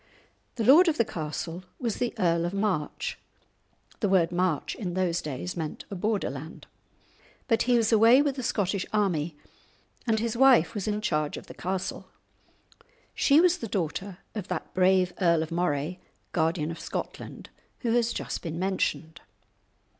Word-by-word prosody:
The 230 - -2
lord 310 - +7
of 320 - +2
the 230 - +3
castle 165 +1 -5
was 235 -5 -2
the 245 -1 -2
Earl 170 -1 +2
of 175 +3 -3
March 195 -7 -2 0.8
(the 205 - +1
word 180 -3 +3
March 175 -3 0
in 180 -5 -5
those 180 -2 0
days 150 +5 -5
meant 160 -3 -5
a - - -3
border 205 - -1
land), 145 +4 -9 0.8
but 225 -3 +2
he 245 - +5
was 225 -1 +2
away 225 +4 +7
with 285 -2 +1
the 265 - -4
Scottish 200 -4 0
army, 170 -7 0 0.7
and 220 -1 +2
his 230 0 -2
wife 250 -7 +5
was 205 -3 -4
in 210 0 -1
charge 150 -7 -1
of - - -9
the - - -11
castle. 190 +1 -4 1.1
She 285 +2 +4
was 360 +1 +4
the 230 - -4
daughter 190 0 -3 0.2
of 210 -4 -5
that 180 -3 -5
brave 185 -1 +3
Earl 170 -3 +4
of 160 - -8
Moray, 170 0 -1 0.3
Guardian 160 -1 0
of 165 - -7
Scotland, - - -6 0.3
who 235 - 0
has 235 0 +2
just - - -4
been 165 -2 -5
mentioned. 185 -3 -2
185 Hz, 165 wpm, -27 LUFS, 170-225 Hz, 1.1 s, lord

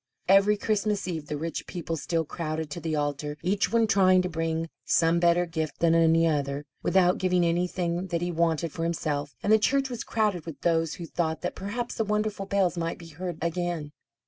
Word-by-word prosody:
Every 195 +2 +5
Christmas 210 -1 0
Eve 160 -4 -4
the 150 - -3
rich 165 +2 -4
people 165 -2 -4
still 165 +1 -1
crowded 155 -1 -4
to 170 - -4
the 160 -2 -2
altar, 145 0 -2
each 195 +3 +1
one 230 0 +4
trying 185 -3 +4
to 180 - -2
bring 165 0 -2 0.2
some 165 +1 +3
better 175 +1 +3
gift 160 -2 -3
than 165 -1 +3
any 165 0 +4
other, 145 -2 -1 0.2
without 180 -1 +3
giving 180 -1 +2
anything 175 +1 -1
that 170 -2 -1
he 175 - -1
wanted 165 -1 0
for 165 - -6
himself, 145 -5 -2
and 210 - +4
the 220 - +6
church 270 +4 +1
was 235 -1 -4
crowded 205 -7 -1
with 165 - -8
those 165 -2 +1
who 170 - -7
thought 160 -1 -2
that 180 - -2
perhaps 235 +5 -4
the 225 - -1
wonderful 210 -2 -1
bells 195 -3 +1
might 165 0 -2
be 165 -1 -12
heard 175 +1 -5
again. 170 -3 -2
170 Hz, 200 wpm, -27 LUFS, 160-190 Hz, 0.2 s, the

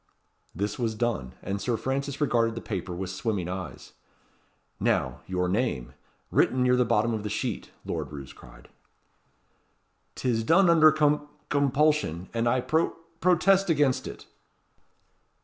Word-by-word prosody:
This 100 +6 -3
was 115 -2 -1
done; 105 - -2
and 100 +1 -3
Sir 115 +3 0
Francis 140 +3 -3
regarded 115 -6 +2
the - - -3
paper 95 -3 -4
with 95 +1 -4
swimming 95 -2 -2
eyes. 90 -1 -7 0.9
"Now, 65 0 0
your 90 -1 0
name, 95 - -1 0.4
written 130 0 +3
near 125 0 +4
the 125 - +4
bottom 115 0 +1
of 110 - -2
the 105 - -4
sheet," - - -3 0.2
Lord - - -4
Roos 70 -2 -8
cried. - - -16 1.5
"'Tis 115 -3 0
done 170 +8 +5
under 155 -2 +7
com 150 -1 +2 0.2
compulsion; 140 - +1
and 115 0 0
I 130 +1 +2
pro 160 +6 0 0.2
protest 185 +2 +3
against 145 -5 +2
it." - - -9
120 Hz, 140 wpm, -27 LUFS, 95-145 Hz, 1.5 s, under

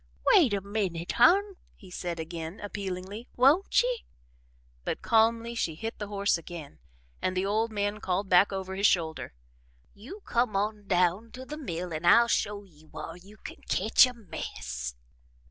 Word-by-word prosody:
"Wait 275 -10 +6
a 200 -1 0
minute, 190 -4 -2
Hon," 385 +8 +5 0.2
he 190 -3 -15
said 175 -2 -4
again, 165 +2 -6
appealingly, 200 +2 -6
"won't 290 - +4
ye?" - - -2 0.8
but - - -4
calmly 230 +1 +2
she 170 -9 -2
hit 225 +7 -6
the 205 - -4
horse 200 -3 0
again 165 -3 -10 0.4
and 185 0 -1
the 185 - +1
old 220 +3 0
man 205 0 -2
called 190 0 -1
back 185 +2 +5
over 190 -1 -4
his 200 +2 +3
shoulder: 160 - -1 0.6
"You 270 - -11
come 235 -3 0
on 205 0 -2
down 185 +4 +1
to 255 +1 -8
the 300 - -6
mill 180 - -5
an' 155 +2 -4
I'll 235 +7 +7
show 205 -3 -1
ye 160 -6 -21
whar 165 +1 -8
you 195 +4 -15
can - - -10
ketch 220 +6 +5
a 250 - -6
mess." 65 - -6
200 Hz, 165 wpm, -28 LUFS, 180-230 Hz, 0.8 s, I'll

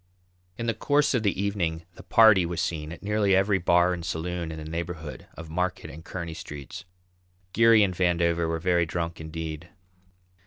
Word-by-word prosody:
In 115 - -4
the 115 - +1
course 145 +7 +1
of 125 - +1
the 100 -3 0
evening 90 -5 -1
the - - -13
patty 110 -5 +6
was 85 -1 -3
seen 80 -2 -3
at 85 - -10
nearly 105 -1 +2
every 95 0 +2
bar 85 +1 +3
and 85 -1 -5
saloon 85 0 -3
in 80 - -6
the 80 - -7
neighbourhood 80 -1 -6
of 80 -1 -9
Market 90 +2 -2
and 80 +3 -11
Kearney 85 -2 -6
streets. 75 -4 -9 0.7
Geary 115 -2 +6
and 95 -2 0
Vandover 85 -2 +1
were 80 0 -1
very 85 0 +1
drunk 85 0 -4
indeed. 80 +1 -6
85 Hz, 180 wpm, -26 LUFS, 80-95 Hz, 0.7 s, patty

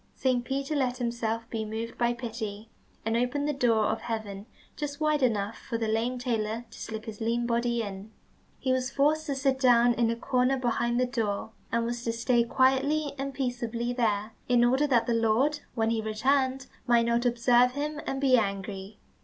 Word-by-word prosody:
Saint 255 -2 +1
Peter 275 +4 -2
let 255 -3 0
himself 230 -2 -2
be 225 -1 -2
moved 220 +2 -5
by 240 0 +1
pity, 225 -3 -6 0.3
and 225 0 0
opened 250 +5 0
the 295 - 0
door 235 -5 +2
of 220 +1 -1
heaven 215 -3 -5 0.3
just 285 -1 -4
wide 305 -1 +2
enough 220 -3 +1
for 230 - -4
the 225 -1 -1
lame 230 +3 0
tailor 230 -2 -2
to - - -12
slip 220 0 -6
his 220 -1 -8
lean 235 +1 0
body 235 0 0
in. 200 0 -7 0.5
He 260 - -1
was 255 0 +1
forced 305 +3 +1
to 280 - -1
sit 270 -1 +1
down 245 -2 +5
in 235 -1 +1
a 230 - 0
corner 255 +2 +1
behind 240 -1 0
the 255 - +3
door, 220 -4 -2 0.2
and 230 0 +1
was 240 0 -3
to 230 - 0
stay 235 +1 +2
quietly 270 +5 +2
and 275 0 -2
peaceably 245 -2 -2
there, 215 -3 0 0.2
in 240 -1 +4
order 265 +4 +3
that 240 -4 +3
the 235 - 0
Lord, 230 +7 +2 0.2
when 225 -1 +1
he 225 -1 0
returned, 260 +5 +1 0.2
might 235 -1 +4
not 235 +1 +1
observe 245 0 +4
him 295 +2 -3
and 270 - -2
be 265 -2 +4
angry. 195 -1 -3
240 Hz, 195 wpm, -28 LUFS, 225-260 Hz, 0.5 s, down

